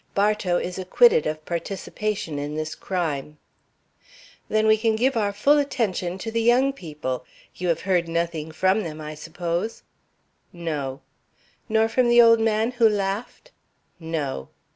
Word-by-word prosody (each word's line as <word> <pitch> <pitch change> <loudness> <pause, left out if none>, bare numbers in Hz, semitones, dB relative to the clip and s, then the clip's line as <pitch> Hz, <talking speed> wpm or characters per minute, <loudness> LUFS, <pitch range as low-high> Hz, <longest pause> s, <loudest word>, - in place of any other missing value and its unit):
Bartow 200 -3 +2
is 180 +1 -4
acquitted 470 - +4
of 155 0 -4
participation 190 -1 -3
in 145 +1 -4
this 155 0 -3
crime." 150 -5 -3 1.1
"Then 215 0 +2
we 215 0 +6
can 220 0 +1
give 255 +4 +1
our 210 -3 +1
full 285 +9 +3
attention 200 -10 -1
to 225 +4 -5
the 230 +1 0
young 250 +4 +4
people. 150 - -5 0.3
You 180 - -4
have 165 -1 +1
heard 180 -3 +1
nothing 165 -2 -2
from 190 +6 +2
them, 155 -5 -6
I 155 0 -6
suppose?" 170 +6 -4 0.7
"No." 150 -6 -4 0.7
"Nor 220 0 +3
from 240 +2 +2
the 240 0 +6
old 230 -1 +7
man 225 +1 +1
who 240 -3 +4
laughed?" 205 - -3 0.5
"No." 150 - -4
190 Hz, 145 wpm, -24 LUFS, 160-225 Hz, 1.1 s, old